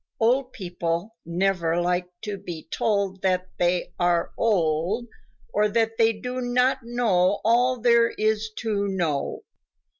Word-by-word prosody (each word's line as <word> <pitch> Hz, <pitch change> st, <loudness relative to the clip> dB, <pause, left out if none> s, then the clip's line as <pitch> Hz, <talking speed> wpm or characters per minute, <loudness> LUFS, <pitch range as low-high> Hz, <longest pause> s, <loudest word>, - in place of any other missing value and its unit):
Old 250 Hz, +3 st, +2 dB
people 175 Hz, +1 st, -3 dB
never 175 Hz, -1 st, +1 dB
like 180 Hz, +1 st, 0 dB, 0.2 s
to 210 Hz, -2 st, -3 dB
be 175 Hz, -5 st, -8 dB
told 200 Hz, -3 st, 0 dB
that 185 Hz, -1 st, 0 dB
they 175 Hz, 0 st, +1 dB
are 175 Hz, -1 st, +1 dB
old 185 Hz, +1 st, +1 dB, 0.5 s
or 210 Hz, +1 st, +3 dB
that 225 Hz, +1 st, 0 dB
they 225 Hz, 0 st, +5 dB
do 250 Hz, +4 st, -5 dB
not 250 Hz, +2 st, +2 dB
know 210 Hz, -6 st, +1 dB
all 245 Hz, +2 st, +3 dB
there 235 Hz, 0 st, +4 dB
is 215 Hz, 0 st, 0 dB
to 205 Hz, -3 st, -1 dB
know. 170 Hz, -7 st, -2 dB
205 Hz, 130 wpm, -25 LUFS, 180-230 Hz, 0.5 s, they